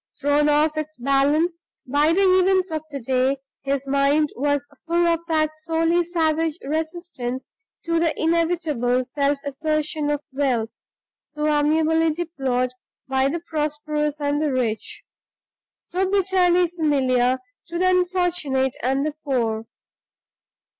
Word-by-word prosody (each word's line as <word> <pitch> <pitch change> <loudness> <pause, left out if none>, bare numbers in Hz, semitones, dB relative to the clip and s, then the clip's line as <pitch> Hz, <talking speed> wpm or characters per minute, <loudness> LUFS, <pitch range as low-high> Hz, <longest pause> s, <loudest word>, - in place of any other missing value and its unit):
Thrown 290 +1 +2
off 300 +1 +2
its 310 0 -4
balance 285 +6 +2 0.3
by 290 +4 +2
the 385 +4 +3
events 375 -1 +3
of 315 -1 -2
the 280 -2 -5
day, 260 +2 +1 0.2
his 275 0 -2
mind 280 +2 +2
was 285 +1 0 0.2
full 340 +1 +2
of 335 -1 +2
that 310 -2 +1
sourly 330 +2 +1
savage 325 -2 0
resistance 315 -4 -4 0.4
to 335 0 +1
the 330 -2 0
inevitable 320 -7 +1
self 280 +2 0
assertion 305 +1 -1
of 295 -1 0
wealth, 255 -5 0 0.5
so 300 0 -5
amiably 315 +2 +3
deplored 270 -7 -2 0.3
by 265 0 +2
the 335 +3 -3
prosperous 300 -2 -2
and 290 0 0
the 305 -2 +1
rich; 235 -4 -2 0.7
so 370 +2 -2
bitterly 365 -2 +3
familiar 265 -7 +1 0.3
to 340 0 -4
the 370 +1 +2
unfortunate 355 -8 +1
and 270 +3 0
the 305 - -2
poor. 230 -5 -1
300 Hz, 125 wpm, -23 LUFS, 275-330 Hz, 0.7 s, the